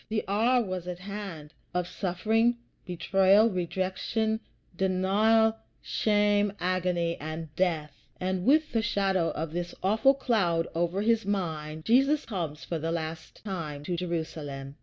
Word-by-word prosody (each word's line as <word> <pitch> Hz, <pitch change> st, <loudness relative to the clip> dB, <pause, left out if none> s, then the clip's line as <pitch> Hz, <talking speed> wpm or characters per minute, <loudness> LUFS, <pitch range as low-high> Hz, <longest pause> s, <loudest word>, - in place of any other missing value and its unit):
The 215 Hz, 0 st, 0 dB
hour 235 Hz, +5 st, +3 dB
was 185 Hz, -3 st, -4 dB
at 180 Hz, -1 st, -4 dB
hand, 185 Hz, -6 st, -7 dB, 0.2 s
of 180 Hz, -1 st, 0 dB
suffering, 220 Hz, +7 st, +1 dB, 0.3 s
betrayal, 195 Hz, +4 st, +4 dB
rejection, 190 Hz, +5 st, -1 dB, 0.4 s
denial, 205 Hz, +5 st, +3 dB, 0.2 s
shame, 205 Hz, -1 st, +2 dB
agony, 180 Hz, -2 st, 0 dB
and 155 Hz, 0 st, -6 dB
death; 160 Hz, -6 st, -1 dB
and 185 Hz, 0 st, -1 dB
with 310 Hz, +7 st, +4 dB
the 225 Hz, -, +1 dB
shadow 195 Hz, -6 st, +1 dB
of 160 Hz, 0 st, -4 dB
this 175 Hz, 0 st, -4 dB
awful 220 Hz, +8 st, +4 dB
cloud 185 Hz, -11 st, +1 dB
over 175 Hz, +4 st, 0 dB
his 230 Hz, 0 st, +3 dB
mind, 160 Hz, -6 st, -3 dB
Jesus 275 Hz, +6 st, +3 dB
comes 170 Hz, -9 st, -4 dB
for 165 Hz, -, -3 dB
the 165 Hz, +2 st, -2 dB
last 160 Hz, -1 st, -5 dB
time 155 Hz, -7 st, -4 dB
to 175 Hz, +3 st, -2 dB
Jerusalem. 155 Hz, -5 st, -4 dB
185 Hz, 135 wpm, -28 LUFS, 165-215 Hz, 0.4 s, betrayal